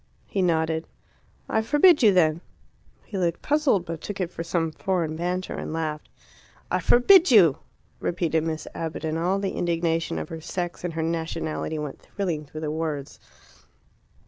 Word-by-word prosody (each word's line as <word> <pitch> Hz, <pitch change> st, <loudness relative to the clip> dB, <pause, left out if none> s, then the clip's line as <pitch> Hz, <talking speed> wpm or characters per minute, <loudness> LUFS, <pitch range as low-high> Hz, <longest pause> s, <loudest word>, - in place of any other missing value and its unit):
He 195 Hz, -, -2 dB
nodded. 160 Hz, -2 st, +1 dB, 0.6 s
"I 220 Hz, -, +1 dB
forbid 295 Hz, +7 st, +5 dB
you, 215 Hz, -4 st, +7 dB
then!" 165 Hz, -3 st, +3 dB, 0.6 s
He 200 Hz, -, -5 dB
looked 170 Hz, -2 st, -1 dB
puzzled, 285 Hz, -, +2 dB
but 165 Hz, -1 st, -6 dB
took 205 Hz, 0 st, -6 dB
it 180 Hz, -2 st, -2 dB
for 165 Hz, -, -5 dB
some 165 Hz, -1 st, -1 dB
foreign 170 Hz, -2 st, -1 dB
banter, 180 Hz, +2 st, -2 dB
and -, -, -5 dB
laughed. 155 Hz, -2 st, -3 dB, 0.6 s
"I -, -, +2 dB
forbid 345 Hz, +9 st, +6 dB
you!" 185 Hz, -, +6 dB, 0.4 s
repeated 165 Hz, -3 st, 0 dB
Miss 160 Hz, -1 st, -3 dB
Abbott, 165 Hz, -1 st, -4 dB
and 160 Hz, +1 st, -1 dB
all 180 Hz, +3 st, +1 dB
the 195 Hz, -1 st, -2 dB
indignation 165 Hz, -1 st, 0 dB
of -, -, -5 dB
her 165 Hz, -1 st, -7 dB
sex 175 Hz, +1 st, -4 dB
and 175 Hz, -2 st, -3 dB
her 160 Hz, -, -1 dB
nationality 160 Hz, -1 st, -3 dB
went 150 Hz, -2 st, -5 dB
thrilling 170 Hz, -7 st, -3 dB
through 155 Hz, +2 st, -8 dB
the 150 Hz, -1 st, -2 dB
words. 155 Hz, -3 st, -4 dB
165 Hz, 165 wpm, -25 LUFS, 160-185 Hz, 0.6 s, you